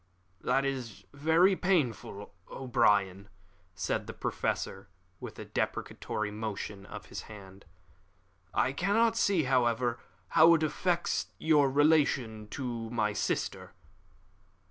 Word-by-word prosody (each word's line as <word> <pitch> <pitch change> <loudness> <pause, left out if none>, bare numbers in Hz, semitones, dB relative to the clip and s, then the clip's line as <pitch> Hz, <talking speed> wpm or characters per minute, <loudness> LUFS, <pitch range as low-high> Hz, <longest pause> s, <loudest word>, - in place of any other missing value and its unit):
"This 135 +1 +2
is 130 -5 -4
very 160 +7 +4
painful, 125 - -1 0.2
O'Brien," 105 -6 +1 0.5
said 95 - -2
the - - -7
Professor, 95 0 -3 0.3
with - - -8
a - - -7
deprecatory 110 -1 -3
motion 105 -2 -5
of - - -9
his - - -7
hand. 100 -2 -12 0.9
"I 130 - +1
cannot 215 +8 +2
see, 200 -7 +2
however, 120 -2 +1 0.3
how 165 +1 +7
it 160 - 0
affects 175 +3 0
your 150 -3 +3
relation 135 -7 +2
to 120 -4 -4
my 105 -3 0
sister." 105 - -2
125 Hz, 110 wpm, -30 LUFS, 105-155 Hz, 0.9 s, how